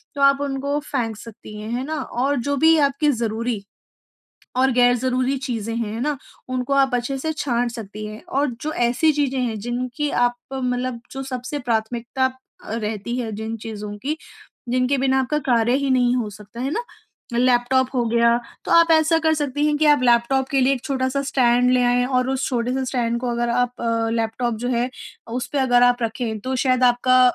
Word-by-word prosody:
तो 280 - -3
आप 275 0 +5
उनको 280 +1 -1
फेंक 230 -7 -2
सकती 215 -1 -11
हैं। 215 +1 -6
है 245 +2 -2
ना? 315 +2 -3
और 265 +4 -1
जो 285 - +1
भी 320 +3 +5
आपकी 285 +1 +2
ज़रूरी, 230 -2 -2 0.9
और 260 +1 +4
ग़ैर 245 0 +4
ज़रूरी 255 +2 0
चीज़ें 230 -4 -3
हैं, 225 -3 -2
है 225 - -4
ना, 295 +3 0 0.3
उनको 255 +1 -2
आप 270 -2 +3
अच्छे 245 +3 -1
से 315 +4 -2
छाँट 245 -5 -1
सकती 215 -2 -7
हैं। 215 +1 -9
और 280 0 0
जो 310 - -2
ऐसी 245 +6 +2
चीज़ें 280 -2 0
हैं 230 -3 -2
जिनकी 250 +5 -3
आप 245 0 +1 0.2
मतलब 250 -1 -2
जो 270 - -5
सबसे 260 +2 -4
प्राथमिकता 240 +2 -1 0.4
अ, - - -7
रहती 220 +1 -3
है 235 -3 -3
जिन 220 +2 -4
चीज़ों 210 -1 -6
की, 285 +8 -2 0.5
जिनके 255 +3 +1
बिना 265 0 +2
आपका 265 +4 0
कार्य 235 0 +3
ही 280 0 -1
नहीं 250 -1 +3
हो 235 -4 -1
सकता 210 +3 -11
है 265 +2 -1
ना, 465 - -1 0.6
लैपटॉप 250 +1 +3
हो 245 -2 +1
गया, 235 0 +4 0.3
तो - - -5
आप 335 0 +6
ऐसा 320 +1 +4
कर 320 0 +3
सकती 290 -1 -1
हैं 300 0 +2
कि 310 - +3
आप 290 -3 +1
लैपटॉप 245 +2 +3
के 275 - +2
लिए 265 +2 +4
एक 250 - -7
छोटा-सा 265 -1 -1
स्टैंड 250 -2 +3
ले 250 -1 +3
आएँ 245 0 +3
और 260 - -4
और 255 +1 0
उस 270 0 -1
छोटे 245 -1 -1
से 265 0 -1
स्टैंड 235 -2 -1
को 250 -1 -2
अगर 240 0 -1
आप 245 0 +1 0.4
लैपटॉप 230 +1 -1
जो - - 0
है 245 0 0 0.4
उसपे 250 +4 -3
अगर 245 -2 +4
आप 245 0 +3
रखें 225 -1 -2
तो 260 +4 -3
शायद 255 -1 +3
आपका 255 +1 +3
250 Hz, 200 wpm, -22 LUFS, 235-270 Hz, 0.9 s, आप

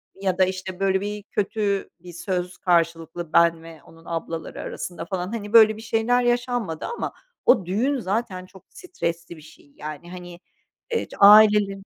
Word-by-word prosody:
ya 190 -2 -2
da, 185 - +5
işte, 185 0 -6
böyle 190 0 +1
bir 205 0 -5
kötü 200 -1 -2
bir 175 0 -12
söz 180 0 -4
karşılıklı 165 -1 -1
ben 170 -1 +4
ve 165 -2 -13
onun 165 +1 -18
ablaları 165 0 -5
arasında 175 -2 -6
falan. 185 +2 -4
Hani 210 -1 -6
böyle 220 -1 +7
bir - - -9
şeyler 230 +2 +1
yaşanmadı 240 -8 -1
ama 475 - -4 0.3
o 190 - +4
düğün 250 +10 0
zaten 195 -2 -3
çok 190 -1 -17
stresli 170 - -5
bir - - -14
şey. 150 -2 -18
Yani 155 +3 -8
hani, 175 -1 -10 0.5
eee, 465 - 0
ç - - -15
ailelerin 205 -1 +6
190 Hz, 165 wpm, -23 LUFS, 170-215 Hz, 0.5 s, böyle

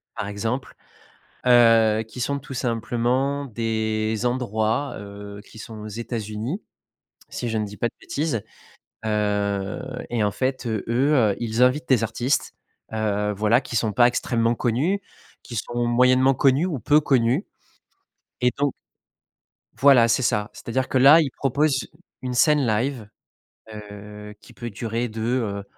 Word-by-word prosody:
par - - -4
exemple, 110 +6 -3 0.7
heu, 115 -3 +5
qui 125 - -10
sont 140 +3 -1
tout 135 -1 -9
simplement 125 +4 -1
des 110 -1 -1
endroits, 120 +1 -1
heu, 100 0 -9
qui 110 - -15
sont 110 +1 -9
aux 105 - -7
États-Unis, 115 - -4 0.7
si 120 - -4
je 110 - -1
ne 105 - -1
dis 105 0 -10
pas 120 - 0
de - - -39
bêtises, 145 -7 -2 0.6
heu 105 -2 -1 0.3
et 120 -2 -1
en 105 - +2
fait, 130 +3 -2
heu, 110 -3 -2
eux, 125 -3 +3
ils 115 +1 0
invitent 125 +2 +1
des 120 -4 +3
artistes, 120 +5 -1 0.4
heu, 105 -1 0
voilà, 110 +4 +3
qui 125 - -9
sont 110 -2 +1
pas 120 +4 +5
extrêmement 120 -1 +1
connus, 135 - 0 0.4
qui 120 - -8
sont 120 +3 -2
moyennement 125 +2 +4
connus 135 +5 +3
ou 165 -7 -3
peu 150 +5 +4
connus 130 - +2 1.0
et 125 - +4
donc 145 -1 +1 1.1
Voilà, 130 -4 +6
c'est 115 +3 +2
ça. 105 -4 0
C'est-à-dire 130 +2 -3
que, - - 0
là, 140 +5 +8
ils 140 -5 -2
proposent, 135 -2 0 0.3
une 125 -1 -3
scène 150 +2 +4
live, 115 0 -1 0.6
heu, 105 0 -10
qui - - -16
peut 120 - -6
durer 115 +3 -3
de, 110 -1 -7
heu, 110 -4 -1
120 Hz, 150 wpm, -23 LUFS, 110-130 Hz, 1.1 s, là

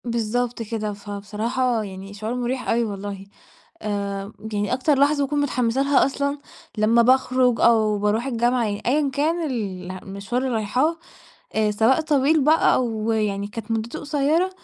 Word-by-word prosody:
بالضبط 235 +1 -1
كده، 215 -1 -3
فبصراحة 215 +4 -2
يعني 195 0 -8
شعور 215 +3 -4
مريح 250 +1 -2
أوي 235 +1 +2
والله، 200 -2 -5 0.6
آآ 200 -1 -3 0.2
يعني 205 +1 -1
أكتر 270 +2 +1
لحظة 285 +1 +3
باكون 290 +1 -1
متحمسة 255 -2 +1
لها 275 0 +4
أصلًا، 280 +1 -2 0.4
لما 225 +2 +4
باخرج 255 -1 +3
أو 215 -3 +4
باروح 210 +4 0
الجامعة، 240 -1 +1
يعني 205 -1 -3
أيًا 280 +3 +2
كان 315 +5 0
ال 190 -7 -4
المشوار 200 +6 -4
اللي 260 -2 -1
رايحاه، 250 +10 +1 0.6
آآ 215 -1 +2
سواء 225 +8 +3
طويل 300 0 +2
بقى 310 +3 +4
أو 225 -3 0
يعني 205 -2 -1
كانت 220 +1 -7
مدته 225 +1 -2
قصيرة، 295 +5 +1
230 Hz, 150 wpm, -23 LUFS, 210-265 Hz, 0.6 s, لها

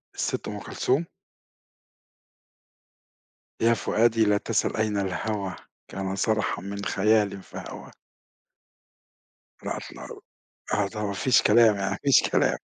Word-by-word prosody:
الست - - -2
أم - - -5
كلثوم؟ 140 +7 -1 2.6
يا 115 +1 +5
فؤادي 115 0 +2
لا 105 0 +3
تسَل - - -1
أين 110 -1 0
الهوى 100 0 -2 0.3
كان 95 0 -4
صرحًا 110 -1 0
من 100 +1 -6
خيالٍ 100 -1 +1
فهوى. - - -9 1.7
الأطلال، - - -7 0.5
آه 100 -1 +2
طبعًا، 105 0 -4
ما 100 - -2
فيش 125 +6 +3
كلام 110 0 +5
يعني، 100 -1 -2
ما 100 - -2
فيش 140 - +6
كلام - - +2
105 Hz, 115 wpm, -26 LUFS, 100-110 Hz, 2.6 s, فيش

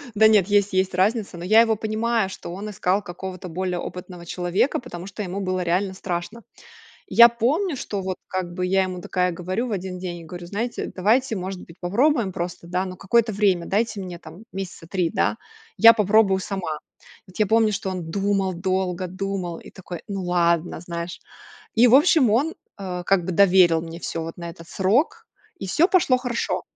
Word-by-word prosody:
Да 220 +1 +7
нет 205 -4 +4
есть 205 -1 +2
есть 190 0 +1
разница, 195 0 0
но 170 - -7
я 215 +4 +6
его 225 -1 +2
понимаю, 220 0 0
что 175 - -8
он 200 +3 -6
искал 200 -1 0
какого-то 185 0 -7
более 180 +1 -2
опытного 180 -1 -8
человека, 180 - 0
потому 180 -8 -8
что 200 - -7
ему 195 0 -4
было 185 -1 -1
реально 180 +3 0
страшно. 190 +4 -5 0.6
Я 235 0 +8
помню, 280 - 0
что 205 -5 -4
вот 185 -1 -3
как 185 -2 -3
бы 180 - -3
я 190 +1 +2
ему 185 -1 -5
такая 180 0 0
говорю 185 +8 -3
в - - -5
один 190 -2 -4
день, 180 -1 -5
и - - -11
говорю: 175 +2 -8
"Знаете, 225 +6 -3
давайте 225 +6 +2
может 185 -1 -5
быть 165 - -16
попробуем 230 +4 +2
просто 175 -1 -5
да 180 +2 -1
но 185 -1 -6
какое-то 220 +4 +2
время 195 -4 +2
дайте 215 +1 -1
мне 180 -2 -7
там 170 +5 -12
месяца 190 -3 -6
3 180 -2 0
да, 220 +2 0 0.4
я 230 +1 +9
попробую 205 -2 +3
сама". 185 -5 -4 0.5
Вот 185 - -14
я 215 - +3
помню, 220 0 +3
что 195 -1 -3
он 180 -3 -5
думал, 195 0 0
долго 185 0 -1
думал 185 -2 -4
и - - -13
такой: 180 -3 -8
"Ну 195 -2 -4
ладно", 170 -2 +1
знаешь. 170 0 -6 0.6
И 235 +2 +6
в 240 - +7
общем, 295 -3 +5
он, 275 +10 +2 0.2
а, 180 -3 -5
как 180 -1 +2
бы 185 - -2
доверил 180 -3 +5
мне 165 0 -8
всё 165 - -4
вот 165 0 -7
на 170 -1 -6
этот 165 -1 -14
срок, 275 - +1 0.3
и - - -5
всё 320 - +3
пошло 345 -9 +3
хорошо. 245 -2 -2
190 Hz, 195 wpm, -23 LUFS, 180-215 Hz, 0.6 s, я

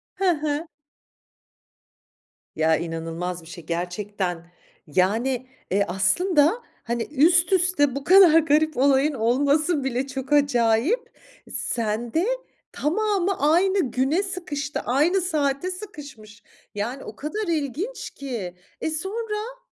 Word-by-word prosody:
Hı 390 - -2
hı. 300 +1 -2 1.9
Ya, 160 0 +3
inanılmaz 165 +1 -4
bir 160 - -16
şey 170 -2 -10
gerçekten, 175 0 -4 0.4
yani, 230 - 0 0.2
eee, 200 +1 +2
aslında, 300 - +2 0.2
hani, 235 -1 -2
üst 345 +6 +4
üste 340 -7 +2
bu 275 - -4
kadar 360 -3 +7
garip 310 -1 +2
olayın 280 +2 +3
olması 280 +6 +1
bile 265 +1 -1
çok 270 +1 -4
acayip. 280 - +2 0.4
Sen 230 0 -2
de 330 +4 +2 0.5
tamamı 390 +3 0
aynı 375 -6 +2
güne 280 +10 +1
sıkıştı, 310 -6 -4
aynı 315 +10 +2
saate 310 0 -1
sıkışmış. 270 - -10 0.3
Yani, 235 +7 -3
o - - -9
kadar 405 +8 -4
ilginç 325 - -3
ki, 225 -10 -6 0.3
eee, - - -1
sonra? 425 +8 -4
280 Hz, 110 wpm, -24 LUFS, 225-350 Hz, 1.9 s, kadar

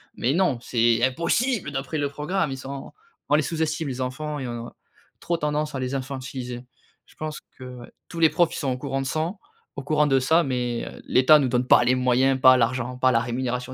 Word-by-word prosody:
Mais 125 +4 0
non, 170 -8 +1
c'est 120 -1 +1
impossible! 170 - 0
D'après 135 +3 -4
le 145 -1 -1
programme, 150 +2 -2
ils 135 - -4
sont 135 +1 -8 0.4
on 150 - +4
les 155 - +3
sous-estime, 160 -1 -2
les 130 0 -5
enfants 145 +4 -4
et 130 - -4
on 120 0 -6
a - - -15 0.5
trop 170 -1 -1
tendance 150 -1 -2
à 135 - -2
les 130 +1 -3
infantiliser. 130 -2 -6 0.4
Je - - -23
pense 155 -1 -5 0.2
que, 130 - -11 0.2
ouais, 120 - -12 0.2
tous 170 - -7
les 160 -1 +6
profs, 175 -2 +1
ils - - -4
sont 135 -3 -1
au 125 - -2
courant 135 0 -3
de 135 - -3
sang 165 +8 -2 0.4
au 140 - -5
courant 150 +1 +2
de 135 -1 +3
ça 160 +6 +3
mais, 125 -3 -2
heu, - - -10
l'État 140 +4 +5
nous 135 - +1
donne 125 0 +1
pas - - +6
les 130 +1 +3
moyens, 130 +1 +2
pas 130 -1 +8
l'argent, 125 +1 -1
pas 130 0 +3
la 115 - +3
rémunération 125 +1 -3
135 Hz, 225 wpm, -24 LUFS, 125-150 Hz, 0.5 s, pas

